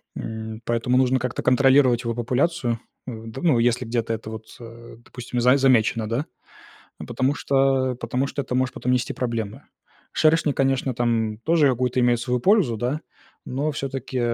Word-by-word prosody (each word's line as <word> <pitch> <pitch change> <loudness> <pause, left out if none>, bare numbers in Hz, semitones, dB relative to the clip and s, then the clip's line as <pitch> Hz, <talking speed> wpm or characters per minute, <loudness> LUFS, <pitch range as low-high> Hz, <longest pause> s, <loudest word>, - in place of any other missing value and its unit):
м, 110 0 -6
поэтому 120 +2 +1
нужно 130 0 +3
как-то 125 0 -3
контролировать 130 -1 +4
его 115 0 -2
популяцию. 125 +1 0 0.3
У 115 -2 -7
д 115 +4 -8
ну, 150 -9 +3
если 120 +1 +1
где-то 115 0 -1
это 110 0 -6
вот, 110 0 -8
э, 115 0 -12
допустим, 125 0 -5
за 125 +3 +5
замечено, 120 -4 +2
да, 125 +6 -1 0.7
а, - - -7
потому 135 +3 0
что 135 -2 +1
потому 125 +2 -2
что 140 - -3
это 125 - -4
может 130 0 0
потом 125 - -1
нести 125 -1 0
проблемы. 115 0 -4 0.5
Шершни, 155 -2 +3
конечно, 135 -1 0
там 115 -3 0
тоже 155 +2 +3
какую-то 125 0 0
имеют 120 -1 +3
свою 125 0 -1
пользу, 175 - +3
да, 130 +7 -2 0.4
но 140 +4 -2
всё-таки, 135 -2 -4
125 Hz, 165 wpm, -23 LUFS, 115-135 Hz, 0.7 s, за